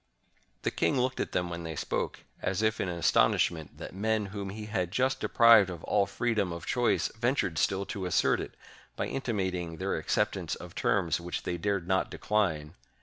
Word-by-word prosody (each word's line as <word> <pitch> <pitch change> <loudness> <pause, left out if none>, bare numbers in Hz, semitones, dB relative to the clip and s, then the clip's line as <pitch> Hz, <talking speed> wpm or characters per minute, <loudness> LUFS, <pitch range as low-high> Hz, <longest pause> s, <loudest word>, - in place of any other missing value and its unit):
The - - 0
king 135 - +1
looked 130 +1 0
at - - -2
them 90 -1 -1
when 85 0 -4
they 80 -1 -5
spoke, - - -2 0.2
as 95 +3 -1
if 110 0 +1
in 95 - -1
astonishment 85 -2 +2
that - - -8
men 110 +2 0
whom 100 -2 -4
he 105 +2 -6
had 95 -5 -1
just 130 +4 +1
deprived 115 -7 +6
of 85 -3 -7
all 100 - +2
freedom 105 -3 0
of 85 +1 -6
choice 120 -2 +1
ventured 110 - 0
still 100 0 +1
to 95 -2 -4
assert 90 - +2
it, - - -8 0.4
by - - -2
inti 130 -4 -2
mating 90 -4 -2
their - - -1
acceptance - - -1
of - - -10
terms 85 -4 +1
which 90 +1 -4
they 90 - -2
dared 100 -2 -1
not 95 0 +1
decline. 80 -8 -1
95 Hz, 190 wpm, -29 LUFS, 85-110 Hz, 0.4 s, deprived